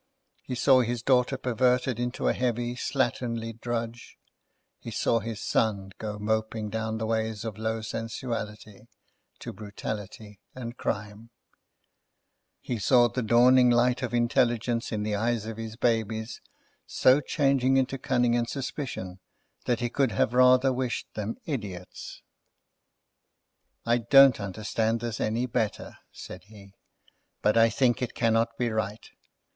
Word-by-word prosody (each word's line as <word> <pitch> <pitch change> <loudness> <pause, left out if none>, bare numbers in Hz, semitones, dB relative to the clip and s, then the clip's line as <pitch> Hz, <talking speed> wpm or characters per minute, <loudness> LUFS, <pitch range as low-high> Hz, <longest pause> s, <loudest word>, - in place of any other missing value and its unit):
He 125 - -5
saw 130 +1 +5
his 120 -1 -2
daughter 130 0 +2
perverted 125 -1 +1
into 125 0 -2
a - - +3
heavy, 120 -1 -1
slatternly 120 -3 -2
drudge; 120 -1 -4 0.6
he - - -8
saw 115 - +1
his 110 0 -6
son 100 -3 0
go 105 -1 -5
moping 110 0 -2
down 110 0 -2
the 110 - -3
ways 110 -1 -2
of 110 -2 -5
low 110 0 -2
sensuality, 110 -2 -5 0.5
to - - -8
brutality 105 0 -7 0.2
and 120 -2 -6
crime; 105 +1 -4 1.3
he 120 -3 -4
saw 120 +3 +4
the 125 - -3
dawning 125 +2 +5
light 125 +2 +3
of 130 - -3
intelligence 120 0 +1
in 105 -2 -2
the 105 0 -2
eyes 110 +1 0
of 110 0 -6
his 115 -1 -6
babies 110 -1 -1 0.5
so 130 +3 +4
changing 135 -2 +2
into 135 0 0
cunning 125 -3 +1
and 120 -1 0
suspicion, 125 -9 -5 0.5
that 120 -2 0
he 120 - 0
could 135 -5 +1
have 110 - +1
rather 130 +1 +5
wished 125 -1 -3
them 110 +1 -4
idiots. 100 - -6 1.6
"I 120 +1 +2
don't 135 +1 +6
understand 110 +3 -1
this 115 -1 -4
any 115 +3 0
the 125 - -10
better," 110 -2 -2
said 90 0 -10
he; 100 -2 -15 0.7
"but 105 +1 +3
I 115 0 +6
think 120 +2 +1
it 125 - -3
cannot 115 0 +1
be 120 -1 0
right. 110 0 -3
115 Hz, 140 wpm, -27 LUFS, 110-125 Hz, 1.6 s, don't